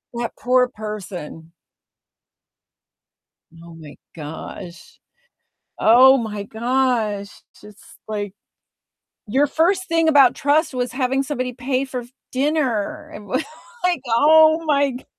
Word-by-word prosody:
that 235 Hz, 0 st, -3 dB
poor 250 Hz, 0 st, +3 dB
person. 190 Hz, -, -8 dB, 2.1 s
Oh 170 Hz, -1 st, -13 dB
my 155 Hz, -3 st, -12 dB, 0.2 s
gosh. 160 Hz, +3 st, -9 dB, 0.8 s
Oh 255 Hz, +4 st, +7 dB
my 210 Hz, -3 st, -4 dB
gosh. 225 Hz, -3 st, -1 dB
It's -, -, -22 dB
just, 210 Hz, -1 st, -16 dB
like, 205 Hz, -2 st, -4 dB, 1.0 s
your 270 Hz, +7 st, +2 dB
first 370 Hz, +6 st, +1 dB
thing 330 Hz, -1 st, +1 dB
about 280 Hz, -5 st, +5 dB
trust 295 Hz, +1 st, +1 dB
was 245 Hz, -1 st, -2 dB
having 265 Hz, +1 st, 0 dB
somebody 255 Hz, -3 st, -4 dB
pay 255 Hz, +2 st, -2 dB
for 255 Hz, -2 st, -5 dB
f 240 Hz, -, -14 dB, 0.2 s
dinner. 265 Hz, -6 st, -1 dB
It -, -, -8 dB
was, 205 Hz, +10 st, -2 dB, 0.4 s
like, 350 Hz, -6 st, +1 dB
oh 315 Hz, +6 st, +5 dB
my 285 Hz, -2 st, +2 dB
g 250 Hz, -, -10 dB
250 Hz, 120 wpm, -21 LUFS, 210-285 Hz, 2.1 s, Oh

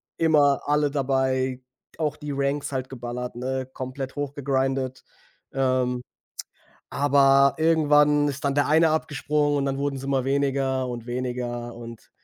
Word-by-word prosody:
immer 150 Hz, -4 st, +3 dB
alle 150 Hz, 0 st, +2 dB
dabei, 130 Hz, -2 st, 0 dB, 0.4 s
auch 150 Hz, -2 st, -1 dB
die 150 Hz, -1 st, -6 dB
Ranks 140 Hz, +1 st, -1 dB
halt 130 Hz, -1 st, -3 dB
geballert, 125 Hz, -1 st, -6 dB
ne, 130 Hz, +1 st, -3 dB
komplett 130 Hz, +1 st, -6 dB
hochgegrinded. 135 Hz, -2 st, -2 dB, 0.5 s
Ähm, 130 Hz, -2 st, 0 dB, 0.9 s
aber 140 Hz, -1 st, +4 dB
irgendwann 150 Hz, -2 st, +4 dB
ist 140 Hz, 0 st, -5 dB
dann 140 Hz, -, +1 dB
der 145 Hz, 0 st, +2 dB
eine 160 Hz, +2 st, +4 dB
abgesprungen 150 Hz, -1 st, 0 dB
und 140 Hz, -, 0 dB
dann 135 Hz, 0 st, -1 dB
wurden's 140 Hz, -1 st, -3 dB
immer 135 Hz, -2 st, 0 dB
weniger 135 Hz, -1 st, 0 dB
und 120 Hz, -1 st, -6 dB
weniger 120 Hz, -1 st, -4 dB
und 115 Hz, -1 st, -11 dB
135 Hz, 130 wpm, -25 LUFS, 130-145 Hz, 0.9 s, aber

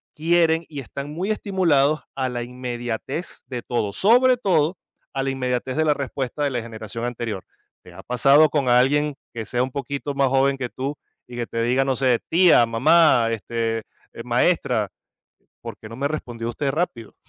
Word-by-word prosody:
quieren 165 Hz, 0 st, +2 dB
y 145 Hz, -3 st, -7 dB
están 140 Hz, +3 st, -7 dB
muy 180 Hz, +6 st, -3 dB
estimulados 165 Hz, -9 st, +2 dB
a 130 Hz, -1 st, -1 dB
la 120 Hz, -1 st, -3 dB
inmediatez 125 Hz, +5 st, -5 dB
de 125 Hz, -2 st, -5 dB
todo, 110 Hz, -4 st, -1 dB
sobre 250 Hz, +5 st, +5 dB
todo, 175 Hz, -6 st, +1 dB, 0.4 s
a 135 Hz, -, -1 dB
la 135 Hz, -, -1 dB
inmediatez 130 Hz, 0 st, -2 dB
de 155 Hz, -, +2 dB
la 150 Hz, -, +4 dB
respuesta 140 Hz, 0 st, -4 dB
de 140 Hz, -, +2 dB
la 120 Hz, -3 st, -2 dB
generación 115 Hz, +1 st, -7 dB
anterior. 115 Hz, -5 st, -4 dB, 0.4 s
¿Te -, -, -15 dB
ha -, -, -11 dB
pasado 140 Hz, +5 st, +5 dB
con 140 Hz, -4 st, 0 dB
alguien 140 Hz, +4 st, +3 dB, 0.2 s
que 110 Hz, -2 st, -5 dB
sea 120 Hz, 0 st, -1 dB
un 130 Hz, -, -4 dB
poquito 140 Hz, +1 st, -4 dB
más 140 Hz, -1 st, +3 dB
joven 135 Hz, +1 st, +2 dB
que 125 Hz, -2 st, -4 dB
tú 140 Hz, +3 st, -4 dB, 0.3 s
y 120 Hz, -, -10 dB
que 120 Hz, -, -2 dB
te 115 Hz, -, -3 dB
diga, 130 Hz, +3 st, +2 dB
no 135 Hz, -1 st, 0 dB
sé, 125 Hz, -3 st, +2 dB
tía, 170 Hz, -8 st, +6 dB
mamá, 130 Hz, +1 st, +4 dB
este, 115 Hz, 0 st, -2 dB, 0.3 s
eh, -, -, -8 dB
maestra, -, -, +1 dB, 0.7 s
¿por -, -, -8 dB
qué 110 Hz, -, -11 dB
no 115 Hz, -, -8 dB
me 140 Hz, +2 st, -1 dB
respondió 120 Hz, -6 st, -5 dB
usted 135 Hz, +4 st, -2 dB
rápido? 135 Hz, -, -3 dB
135 Hz, 185 wpm, -23 LUFS, 120-150 Hz, 0.7 s, tía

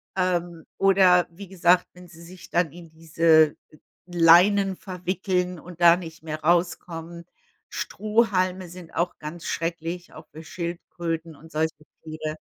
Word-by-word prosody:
Ähm, 175 Hz, -3 st, -1 dB
oder 190 Hz, -2 st, +5 dB
wie 195 Hz, +4 st, -11 dB
gesagt, 180 Hz, -1 st, +3 dB
wenn 180 Hz, 0 st, -14 dB
sie 170 Hz, -1 st, -15 dB
sich 180 Hz, +2 st, -13 dB
dann 175 Hz, -3 st, +1 dB
in 170 Hz, 0 st, -13 dB
diese, 160 Hz, -1 st, +3 dB, 0.2 s
äh, 155 Hz, -, -18 dB, 0.3 s
Leinen 180 Hz, +3 st, +5 dB
verwickeln 180 Hz, -1 st, -3 dB
und 175 Hz, 0 st, -12 dB
da 170 Hz, 0 st, +8 dB
nicht 165 Hz, -2 st, -9 dB
mehr 155 Hz, -1 st, -5 dB
rauskommen. 170 Hz, 0 st, -1 dB, 0.5 s
Strohhalme 190 Hz, -4 st, 0 dB
sind 175 Hz, -1 st, -12 dB
auch 175 Hz, +1 st, -1 dB
ganz 155 Hz, +3 st, -8 dB
schrecklich, 170 Hz, +1 st, -4 dB
auch 155 Hz, -, -12 dB
für 160 Hz, +2 st, -11 dB
Schildkröten 170 Hz, -1 st, -5 dB
und 160 Hz, +3 st, -16 dB
solche 160 Hz, 0 st, -1 dB, 0.3 s
Tiere. 155 Hz, -1 st, -6 dB
175 Hz, 140 wpm, -24 LUFS, 165-180 Hz, 0.5 s, da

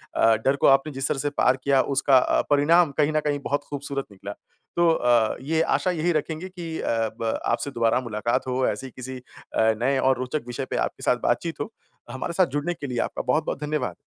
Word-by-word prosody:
अ, 115 Hz, 0 st, +5 dB
डर 135 Hz, -, +4 dB
को 140 Hz, -, +2 dB
आपने 135 Hz, +2 st, +4 dB
जिस 135 Hz, +1 st, -1 dB
तरह -, -, -1 dB
से 145 Hz, -, 0 dB
पार 130 Hz, -, +3 dB
किया 135 Hz, -2 st, +4 dB
उसका 135 Hz, 0 st, +5 dB
अ, 125 Hz, -, +3 dB
परिणाम 150 Hz, +3 st, +4 dB
कहीं 150 Hz, 0 st, +3 dB
न 155 Hz, -, +4 dB
कहीं 145 Hz, -1 st, 0 dB
बहुत 145 Hz, +1 st, -1 dB
खूबसूरत 140 Hz, -1 st, -3 dB
निकला। 100 Hz, +1 st, -8 dB, 0.4 s
तो 170 Hz, 0 st, +4 dB
अ, 120 Hz, -7 st, +2 dB
ये 160 Hz, +4 st, 0 dB
आशा 185 Hz, -, +1 dB
यही 175 Hz, 0 st, 0 dB
रखेंगे 160 Hz, +3 st, -2 dB
कि 170 Hz, -3 st, -6 dB
अ, -, -, -4 dB, 0.3 s
ब 115 Hz, -1 st, -1 dB
आपसे 140 Hz, -, -1 dB
दोबारा 115 Hz, 0 st, +2 dB
मुलाकात 115 Hz, +1 st, -2 dB
हो, 130 Hz, 0 st, 0 dB
ऐसे 135 Hz, -, -3 dB
ही -, -, -12 dB
किसी 130 Hz, +1 st, -7 dB
अ, 110 Hz, -2 st, -1 dB
नए 135 Hz, +2 st, +2 dB
और 130 Hz, -1 st, +2 dB
रोचक 130 Hz, +3 st, -3 dB
विषय 130 Hz, +2 st, -4 dB
पे -, -, -1 dB
आपके -, -, -13 dB
साथ -, -, +2 dB
बात-चीत -, -, -1 dB
हो। -, -, -4 dB, 0.4 s
हमारे 130 Hz, +6 st, -4 dB
साथ 185 Hz, +1 st, +4 dB
जुड़ने 155 Hz, +4 st, -1 dB
के 145 Hz, -4 st, -7 dB
लिए 120 Hz, -2 st, -3 dB
आपका -, -, -2 dB
बहुत-बहुत 155 Hz, +2 st, 0 dB
धन्यवाद। 150 Hz, -4 st, -2 dB
140 Hz, 220 wpm, -24 LUFS, 125-155 Hz, 0.4 s, अ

